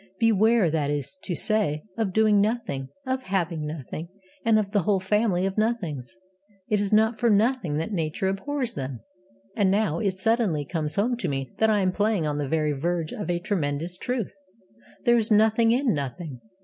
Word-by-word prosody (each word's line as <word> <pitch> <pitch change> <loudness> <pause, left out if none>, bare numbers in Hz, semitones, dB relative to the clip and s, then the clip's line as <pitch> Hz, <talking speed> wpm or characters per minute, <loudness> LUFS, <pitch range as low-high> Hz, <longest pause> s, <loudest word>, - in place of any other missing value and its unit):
Beware, 220 -4 +4
that 150 -3 0
is 145 +4 -2
to 180 - -2
say, 200 -9 0
of 220 -4 -1
Doing 215 0 +4
Nothing, 205 - -1 0.2
of 260 0 -1
Having 175 -8 -2
Nothing, 155 +2 -6 0.3
and 225 -2 +4
of 205 -2 0
the 205 - +3
whole 195 +1 +2
family 190 -1 +1
of 195 +2 -1
Nothings. 160 - -2 0.5
It 210 -2 +2
is 200 - -1
not 220 +1 +3
for 235 - +3
nothing 210 - +2
that 165 +8 -2
Nature 165 0 -1
abhors 245 +6 -2
them. 130 -4 -5 0.5
And 200 -3 +3
now 195 -5 +1
it 195 -3 0
suddenly 195 -7 +1
comes 155 -1 -2
home 235 +5 +1
to - - -2
me 135 -2 -3
that 220 - +4
I 210 -2 +3
am 185 -1 +2
playing 205 -3 +1
on 150 -1 -1
the 140 -2 -2
very 155 -1 +1
verge 165 +3 -2
of 205 - -5
a 175 - +1
tremendous 175 -3 -2
truth. 240 +2 -3 0.7
There 240 0 +5
is 220 - 0
nothing 220 +1 +4
in 250 +1 +2
Nothing. 140 -1 -5
195 Hz, 190 wpm, -25 LUFS, 155-220 Hz, 0.7 s, There